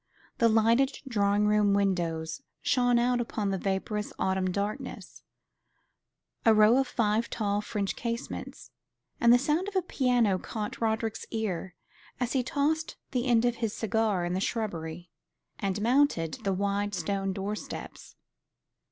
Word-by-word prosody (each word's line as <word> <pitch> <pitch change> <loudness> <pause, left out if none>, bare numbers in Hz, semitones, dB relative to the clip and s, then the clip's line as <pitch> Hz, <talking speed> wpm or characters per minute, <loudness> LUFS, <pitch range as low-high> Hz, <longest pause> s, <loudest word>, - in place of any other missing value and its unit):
The 230 - +5
lighted 230 +5 +3
drawing 205 -3 +2
room 210 -1 +3
windows 170 -5 -1 0.2
shone 245 -2 +3
out 245 +1 +2
upon 210 -4 -2
the 190 - -1
vaporous 205 +2 -2
autumn 190 -1 0
darkness 200 +3 -4 1.2
a 225 -1 +6
row 215 +3 +6
of 270 -1 +2
five 225 -1 0
tall 205 -2 -1
French 205 -2 -2
casements 235 0 -5 0.5
and 235 - +5
the 245 - +8
sound 305 +8 0
of 410 - -6
a 375 - +2
piano 245 -10 +2
caught 210 +3 -5
Roderick's 220 0 -1
ear 190 -5 -3 0.4
as 245 -1 -1
he 265 - +2
tossed 310 +4 -1 0.2
the 250 -1 -1
end 240 -1 +4
of 240 -1 +1
his 225 -3 -2
cigar 215 -4 0
in 175 - -2
the 185 - 0
shrubbery, 175 -6 -3 0.5
and 200 0 -1
mounted 240 - +2
the 195 - +1
wide 200 +1 -1
stone 195 +3 -1
door 195 +2 -3
steps. - - -8
215 Hz, 145 wpm, -28 LUFS, 195-240 Hz, 1.2 s, the